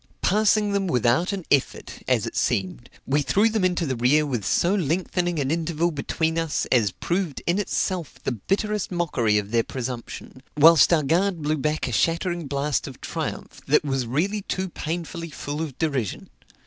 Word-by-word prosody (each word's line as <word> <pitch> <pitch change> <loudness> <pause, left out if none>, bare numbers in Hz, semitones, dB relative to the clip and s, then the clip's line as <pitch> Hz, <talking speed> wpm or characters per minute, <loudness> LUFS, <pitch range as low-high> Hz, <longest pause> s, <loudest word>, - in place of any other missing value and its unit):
Passing 210 +1 +3
them 200 -1 0
without 125 - +2
an 195 -4 -4
effort, 140 -2 0
as - - +2
it - - -6
seemed, 90 -11 -1 0.2
we 145 +2 +1
threw 205 +10 +3
them 220 -3 -1
into 180 -2 +1
the 130 -3 -1
rear 130 +6 +3
with 125 -7 -2
so 175 - +2
lengthening 175 0 0
an 140 -1 0
interval 165 +1 0
between 160 +2 -1
us, 165 -3 -1
as 115 -6 +4
proved 175 - -3
in 175 +4 +1
itself 185 -4 -2
the - - -1
bitterest 200 - -1
mockery 130 -12 +1
of 105 0 -3
their 115 -1 +3
presumption; 125 +1 -6 0.2
whilst 160 +1 +7
our 160 -3 +3
guard 170 +3 +1
blew 155 +1 +1
back 150 +1 -1
a - - -3
shattering 170 - 0
blast 140 -1 -1
of - - -10
triumph, - - -5
that - - +3
was 135 -4 -1
really 185 - 0
too 190 -1 -3
painfully 165 0 -5
full 145 0 -5
of 150 -6 -5
derision. 140 - -2
160 Hz, 175 wpm, -24 LUFS, 135-180 Hz, 0.2 s, whilst